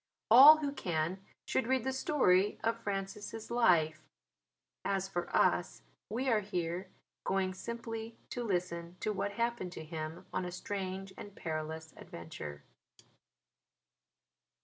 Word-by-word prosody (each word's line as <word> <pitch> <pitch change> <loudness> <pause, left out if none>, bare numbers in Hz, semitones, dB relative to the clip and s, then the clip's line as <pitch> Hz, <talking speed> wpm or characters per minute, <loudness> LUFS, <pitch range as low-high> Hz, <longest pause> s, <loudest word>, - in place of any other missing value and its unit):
All 280 +6 +11
who 290 -2 -2
can 185 - -2 0.2
should 245 - 0
read 260 -2 +2
the 265 +1 -1
story 210 -9 +3
of 230 +1 0
Francis' 205 +2 -4
life: 165 -10 +3 0.8
as 195 -1 0
for 175 -2 -3
us - - +2 0.3
we 250 +5 -2
are 225 -4 +4
here 180 -2 -3 0.3
going 190 -1 0
simply 225 +2 -6
to 245 - -3
listen 175 -4 -2
to 215 - 0
what 200 +1 -2
happened 235 -5 -1
to 160 - -7
him 155 0 -6
on - - 0
a 180 - -4
strange 190 +1 -4
and 205 -1 -9
perilous 160 -1 -4
adventure. 75 -3 -8
195 Hz, 125 wpm, -33 LUFS, 170-230 Hz, 0.8 s, All